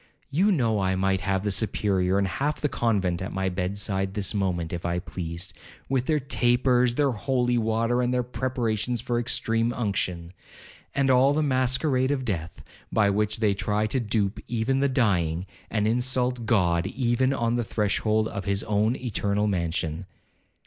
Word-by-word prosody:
You 190 Hz, +9 st, +3 dB
know 115 Hz, -, +1 dB
I 95 Hz, -1 st, +1 dB
might 95 Hz, 0 st, +1 dB
have 95 Hz, +1 st, 0 dB
the 105 Hz, -, 0 dB
Superior 95 Hz, -2 st, +1 dB
and 100 Hz, -1 st, +1 dB
half 140 Hz, +10 st, -2 dB
the 150 Hz, -, +1 dB
convent 100 Hz, -10 st, 0 dB
at 95 Hz, -, -4 dB
my 95 Hz, 0 st, -1 dB
bed 90 Hz, +2 st, -2 dB
side 95 Hz, -1 st, -1 dB
this 105 Hz, 0 st, 0 dB
moment 90 Hz, -5 st, -1 dB
if 85 Hz, -, -4 dB
I 85 Hz, 0 st, -1 dB
pleased, 90 Hz, 0 st, -5 dB, 0.4 s
with 130 Hz, -1 st, 0 dB
their 155 Hz, -, +3 dB
tapers, 125 Hz, -2 st, +2 dB
their 145 Hz, -1 st, +2 dB
holy 125 Hz, +1 st, 0 dB
water, 115 Hz, +2 st, +1 dB
and 125 Hz, 0 st, 0 dB
their 125 Hz, 0 st, +1 dB
preparations 120 Hz, -2 st, -1 dB
for 120 Hz, +2 st, -1 dB
extreme 115 Hz, -1 st, 0 dB
unction, 95 Hz, -7 st, -2 dB, 0.6 s
and 135 Hz, -1 st, +3 dB
all 130 Hz, +2 st, +5 dB
the 155 Hz, +1 st, +1 dB
masquerade 130 Hz, 0 st, +1 dB
of 135 Hz, -3 st, -1 dB
death, 85 Hz, -7 st, -4 dB, 0.3 s
by 105 Hz, -2 st, +3 dB
which 105 Hz, +2 st, -1 dB
they 105 Hz, -2 st, +3 dB
try 105 Hz, +2 st, 0 dB
to 120 Hz, +5 st, 0 dB
dupe 105 Hz, -3 st, -1 dB
even 120 Hz, +3 st, 0 dB
the 140 Hz, 0 st, +2 dB
dying, 95 Hz, -, +1 dB, 0.2 s
and 105 Hz, -1 st, 0 dB
insult 125 Hz, 0 st, 0 dB
God 90 Hz, -5 st, +2 dB
even 125 Hz, +3 st, +1 dB
on 115 Hz, -3 st, 0 dB
the 120 Hz, 0 st, 0 dB
threshold 110 Hz, 0 st, 0 dB
of 100 Hz, -3 st, -5 dB
his 100 Hz, 0 st, 0 dB
own 105 Hz, +3 st, +1 dB
eternal 105 Hz, -5 st, -1 dB
mansion. 85 Hz, -2 st, -2 dB
110 Hz, 170 wpm, -26 LUFS, 95-125 Hz, 0.6 s, all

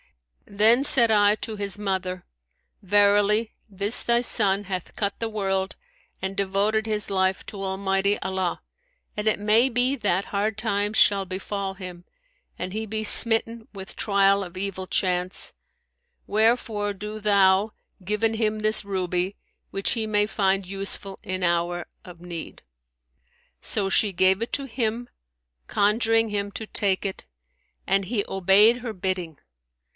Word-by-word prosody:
[FN#168] 200 Hz, -, -15 dB
Then 230 Hz, +5 st, +5 dB
said 240 Hz, -5 st, +6 dB
I 205 Hz, -1 st, +4 dB
to 215 Hz, 0 st, -6 dB
his 200 Hz, 0 st, -3 dB
mother, 185 Hz, -3 st, -3 dB, 0.6 s
Verily 205 Hz, +2 st, +3 dB, 0.2 s
this 200 Hz, +4 st, 0 dB
thy 235 Hz, 0 st, +3 dB
son 205 Hz, -4 st, +3 dB
hath 185 Hz, -2 st, -5 dB
cut 200 Hz, -1 st, -1 dB
the 230 Hz, -, -2 dB
world 195 Hz, -3 st, -2 dB, 0.5 s
and 190 Hz, +1 st, -3 dB
devoted 200 Hz, +3 st, 0 dB
his 210 Hz, -2 st, +1 dB
life 190 Hz, -1 st, 0 dB
to 200 Hz, -2 st, -7 dB
Almighty 195 Hz, +1 st, 0 dB
Allah, 190 Hz, -2 st, -2 dB, 0.5 s
and 210 Hz, +1 st, -3 dB
it 215 Hz, -, 0 dB
may 220 Hz, +5 st, +3 dB
be 250 Hz, +2 st, +1 dB
that 195 Hz, -6 st, 0 dB
hard 210 Hz, +1 st, -2 dB
times 210 Hz, -1 st, -1 dB
shall 200 Hz, -1 st, +4 dB
befal 195 Hz, +1 st, -4 dB
him 180 Hz, -2 st, -9 dB, 0.5 s
and 185 Hz, +1 st, -5 dB
he 220 Hz, +1 st, -3 dB
be 220 Hz, 0 st, -3 dB
smitten 225 Hz, +1 st, +2 dB
with 195 Hz, -1 st, -9 dB
trial 200 Hz, -1 st, +2 dB
of 180 Hz, -1 st, -10 dB
evil 190 Hz, -1 st, -4 dB
chance; 180 Hz, -1 st, -1 dB, 0.7 s
wherefore 215 Hz, -1 st, +1 dB
do 210 Hz, +2 st, -7 dB
thou 200 Hz, 0 st, +3 dB, 0.3 s
given 210 Hz, +4 st, 0 dB
him 215 Hz, -1 st, -1 dB
this 215 Hz, 0 st, +1 dB
ruby, 185 Hz, -1 st, -2 dB, 0.3 s
which 195 Hz, 0 st, -1 dB
he 225 Hz, -2 st, -1 dB
may 210 Hz, -1 st, +1 dB
find 195 Hz, -2 st, 0 dB
useful 195 Hz, 0 st, -2 dB
in 185 Hz, 0 st, -3 dB
hour 175 Hz, 0 st, 0 dB, 0.2 s
of 175 Hz, -2 st, -13 dB
need.' 170 Hz, -2 st, -8 dB, 1.0 s
So 205 Hz, -3 st, -1 dB
she 200 Hz, +1 st, +3 dB
gave 190 Hz, +2 st, +2 dB
it 230 Hz, -, -4 dB
him, 240 Hz, -3 st, -3 dB, 0.6 s
conjuring 225 Hz, +2 st, +2 dB
him 200 Hz, -1 st, -3 dB
to 220 Hz, -, -5 dB
take 195 Hz, -3 st, 0 dB
it, 195 Hz, -, -4 dB, 0.6 s
and 195 Hz, 0 st, +2 dB
he 205 Hz, +1 st, -2 dB
obeyed 195 Hz, +5 st, +4 dB
her 240 Hz, -2 st, -5 dB
bidding. 180 Hz, -5 st, -3 dB
200 Hz, 145 wpm, -24 LUFS, 190-215 Hz, 1.0 s, said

